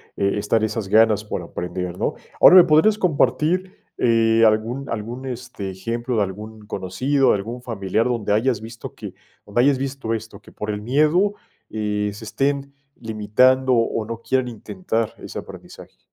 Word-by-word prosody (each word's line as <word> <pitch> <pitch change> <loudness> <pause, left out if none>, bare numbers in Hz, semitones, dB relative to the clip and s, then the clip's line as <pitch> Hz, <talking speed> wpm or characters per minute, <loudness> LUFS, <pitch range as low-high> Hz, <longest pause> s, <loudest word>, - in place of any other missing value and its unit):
eh, 100 +1 0
estar 105 +2 +1
esas 110 -2 -2
ganas 110 0 +4
por 105 - -4
aprender, 90 +1 -5
¿no? - - -1 0.3
Ahora, - - +9
¿me 180 - +10
podrías 175 +6 +4
compartir, 170 - +1 0.2
eh, 115 -1 +3
algún 115 +5 +1
algún 115 +4 -5
este 120 -6 -6
ejemplo 115 +6 -3
de 105 - +3
algún 105 +3 -7
conocido, 130 +10 +1
algún 115 +5 -4
familiar 110 -2 -1
donde 115 -5 -1
hayas 110 +1 +1
visto 115 +1 -9
que - - -8 0.3
donde 105 +3 -2
hayas 140 +1 +4
visto 135 -3 -3
esto, 110 -2 -6
que - - -17
por 105 - -6
el 105 0 -4
miedo, 155 - +2 0.4
eh, 105 -1 -2
se 105 +2 -10
estén 140 +3 -2 0.2
limitando 125 +4 +2
o 115 -2 +1
no 115 0 -6
quieran 130 +1 0
intentar 115 - -3
ese - - -8
aprendizaje. - - -12
115 Hz, 160 wpm, -22 LUFS, 105-130 Hz, 0.4 s, me